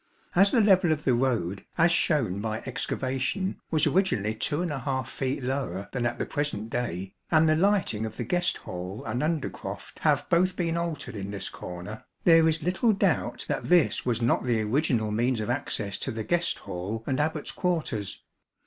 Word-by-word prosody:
As 195 +3 +6
the 235 - +4
level 190 -5 +5
of 150 -1 0
the 130 - +3
road, 120 -7 0
as 170 +1 +5
shown 125 - +2
by 110 +1 -3
excavation, 135 +7 -2
was 155 -2 +2
originally 110 - +2
2^ 135 0 -1
feet 130 +1 -3
lower 125 -8 -3
than 125 -2 0
at 120 - -3
the - - -2
present 145 -8 -3
day, 95 -6 -3 0.2
and 160 -1 +5
the 155 - +4
lighting 185 - +2
of 110 - -9
the - - -2
guest 180 0 +1
hall 90 +3 -6
and 125 - -2
undercroft 155 -1 -3
have - - +2
both 180 +2 +3
been 170 -2 -1
altered 170 -7 -3
in 100 -1 -5
this 100 -1 -3
corner, 90 +5 -8 0.2
there 165 -1 +6
is 155 -1 -1
little 190 +6 +2
doubt 195 -5 0
that - - -2
this 175 -2 +3
was 120 -2 0
not 120 - +2
the 120 -3 +1
original 115 -2 +1
means 120 +3 +1
of 110 +3 -1
access 105 -7 -2
to - - -2
the 110 -1 -4
guest 175 +7 +1
hall 100 +6 -5
and 135 0 -1
Abbat's 155 0 -1
quarters. 160 - -2
135 Hz, 180 wpm, -27 LUFS, 110-165 Hz, 0.2 s, As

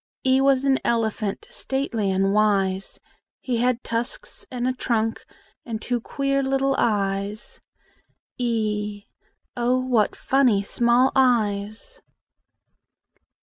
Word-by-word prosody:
E 260 0 +4
was 270 -1 +3
an 270 -1 +3
elephant, 220 -3 -1
Stately 265 -7 -2
and 195 +1 +1
wise: 195 -2 +1 0.4
He 250 -3 -2
had 245 0 +1
tusks 235 - -4
and 250 -1 -2
a 255 - +1
trunk, 225 -3 -1 0.4
And 225 -3 -5
two 245 +1 -2
queer 275 +3 -1
little 270 0 +1
eyes, 200 0 -1 0.7
e 210 -4 -2 0.5
Oh, 245 +1 +1
what 245 -5 +1
funny 250 -7 +2
small 240 +5 +3
eyes! 225 - 0
235 Hz, 105 wpm, -23 LUFS, 210-260 Hz, 0.7 s, E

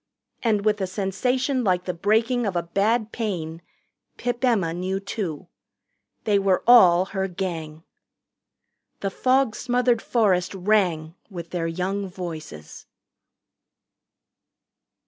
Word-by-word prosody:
And 215 -3 +1
with 210 -1 +2
a 190 - 0
sensation 250 +8 -1
like 180 -3 +1
the 180 - -2
breaking 225 +6 +1
of 190 - -3
a 170 - 0
bad 215 +6 0
pain 170 -8 -4 0.6
Pip 245 +1 -3
Emma 205 -10 +2
knew, 185 +2 -2
too. 190 -5 -5 0.8
They 205 -2 +2
were 195 -2 +1
all 185 -7 +7
her 190 -1 -1
Gang. 165 -4 -5 1.2
The 195 - -2
fog 255 0 +2
smothered 245 -2 +1
forest 195 -6 +1
rang 180 -5 +1 0.2
with 170 -4 -8
their 170 -2 -2
young 190 +4 -2
voices. 160 - -8
195 Hz, 115 wpm, -24 LUFS, 175-225 Hz, 1.2 s, all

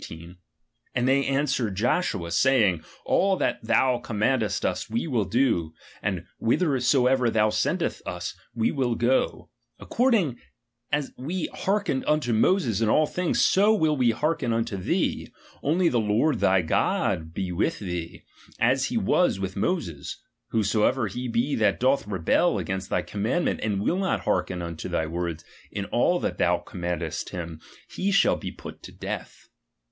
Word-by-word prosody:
16 80 - -8
18): 85 +2 -13 0.6
And 125 0 +1
they 135 +1 +3
answered 135 -7 0
Joshua, 105 - 0
saying, 105 - +3 0.2
all 195 0 +3
that - - -1
thou 125 -2 +2
commandest 110 -2 0
us, - - -2
we 115 +6 -1
will 120 -10 0
do; 95 -7 +1
" - - -22
and 90 -4 -2 0.2
IE 115 - -1
hit - - -4
her 145 -7 +2
soever 125 0 +3
thou 110 -1 +3
sendest - - -1
vs, - - -5 0.2
we 115 0 +1
will 125 -5 0
go; 120 +3 0 0.3
according 215 - +1 0.5
as 150 -1 0
we 165 +7 -3
hearkened 200 -9 0
vnto 150 -6 +1
Moses 115 - +2
in 110 - +2
all 155 +7 +4
things, 180 +3 +1
so 205 +3 +4
will 160 -6 +2
we 125 -4 +3
hearken 135 +1 0
unto 115 -2 -1
thee; 95 - -1 0.3
only 170 +5 +2
the 125 -7 +2
Lord 110 +8 +1
thy 95 -1 +3
God 80 0 0
he 95 -2 -2
with 90 +3 0
thee, 90 -3 -5 0.3
as 130 +2 +2
he 180 - -2
was 195 - +2
with 95 -1 -4
Moses; 85 - -2 0.3
whosoever 110 +3 +1
he 125 +6 -4
be 120 +5 0
that 110 - +2
doth 130 -2 +2
rebel 95 -5 +2
against 95 0 -3
thy - - 0
commandment, 110 - -1
and 100 -2 -1
will 180 - +1
not 190 -1 0
hearhen 90 -2 -1
unto 85 -1 -6
thy 80 - 0
words 85 0 -4 0.2
in 100 - -4
all 175 - +2
that - - -3
thou 90 0 +3
commandest 85 -1 -4
him, 85 -3 -6 0.3
he 195 - -2
shall 195 -1 +3
he - - -5
put - - -11
to - - -10
death. - - -7
120 Hz, 165 wpm, -25 LUFS, 95-145 Hz, 0.6 s, all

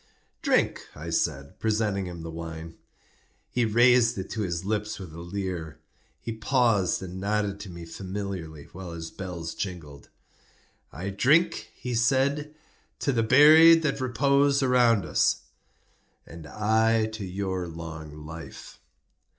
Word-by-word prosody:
"Drink," - - +1
I 85 +3 -7
said, 70 -4 -2
presenting 105 -3 0
him 85 -2 -8
the 80 - -6
wine. 80 0 -7 0.8
He 120 -1 +1
raised 120 +1 +4
it 95 0 -5
to 110 - -3
his 90 -2 -3
lips 105 +1 -2
with 90 -5 -9
a 85 - -9
leer. 85 -4 -5 0.4
He 115 - -5
paused 110 -5 +1
and 95 0 -7
nodded 100 0 -1
to 100 - -8
me 85 -1 -9
familiarly, 90 -4 -6
while 90 -1 -8
his 80 -1 -7
bells 90 -3 -6
jingled. 80 -7 -7 0.8
"I 95 +6 -5
drink," 155 - +2
he 125 - -5
said, 135 +6 +1 0.4
"to 140 - 0
the 115 - +2
buried 155 +7 +7
that 140 -3 -1
repose 140 +2 +2
around 120 -5 +3
us." - - +1 0.8
"And 85 -2 -11
I 110 +4 +2
to 110 -1 -6
your 95 -1 -3
long 80 -2 -8
life." 80 +1 -10
100 Hz, 135 wpm, -26 LUFS, 85-115 Hz, 0.8 s, buried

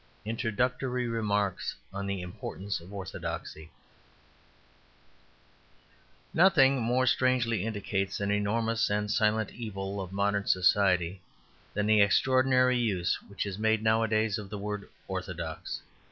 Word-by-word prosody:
Introductory 125 +2 -1
Remarks 105 -4 -1 0.2
on 100 0 -4
the 100 -2 -2
Importance 95 +2 -5
of 85 +3 -13
Orthodoxy 95 -5 -6 2.6
Nothing 140 -7 +5
more 125 +3 +2
strangely 120 -5 +2
indicates 100 -2 -2
an 100 0 0
enormous 110 +3 +1
and 105 0 0
silent 110 -1 +1
evil 100 -3 -5
of 95 -1 -7
modern 100 +1 0
society 90 -1 +3 0.5
than 105 0 +1
the 105 0 +5
extraordinary 130 +3 +4
use 95 -7 0
which 100 -1 -4
is 100 0 -5
made 110 0 +2
nowadays 110 -1 +2
of 100 -2 -8
the 105 - -5
word 105 0 -5 0.2
"orthodox." - - -5
105 Hz, 115 wpm, -29 LUFS, 100-115 Hz, 2.6 s, Nothing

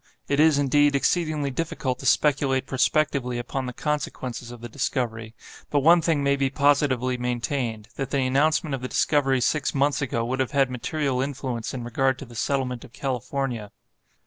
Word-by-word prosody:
It 140 - +1
is, 155 -1 +5
indeed, 145 +1 +3
exceedingly 155 -1 +1
difficult 135 -3 -2
to - - -3
speculate 135 -3 +2
prospectively 135 -2 +1
upon 125 +2 -3
the - - -3
consequences 130 -4 -3
of 120 -1 -9
the 120 - -7
discovery, 115 -3 -3 0.3
but 145 - +2
one 170 +4 +6
thing 160 -3 +1
may 140 0 +3
be 135 -1 0
positively 135 -3 +2
maintained—that 125 0 -3
the 135 -2 +1
announcement 150 +3 +2
of 135 - -3
the 130 - -3
discovery 135 -2 +2
six 145 +2 0
months 140 +1 +2
ago 115 -4 -1
would 130 +2 -2
have 130 +2 -1
had 135 -2 +3
material 135 +1 -1
influence 130 -4 -3
in 125 -2 -5
regard 130 +2 +1
to 135 - -8
the 120 - -14
settlement 125 +1 -1
of 130 - -14
California. 130 -4 -3
135 Hz, 170 wpm, -25 LUFS, 125-145 Hz, 0.3 s, one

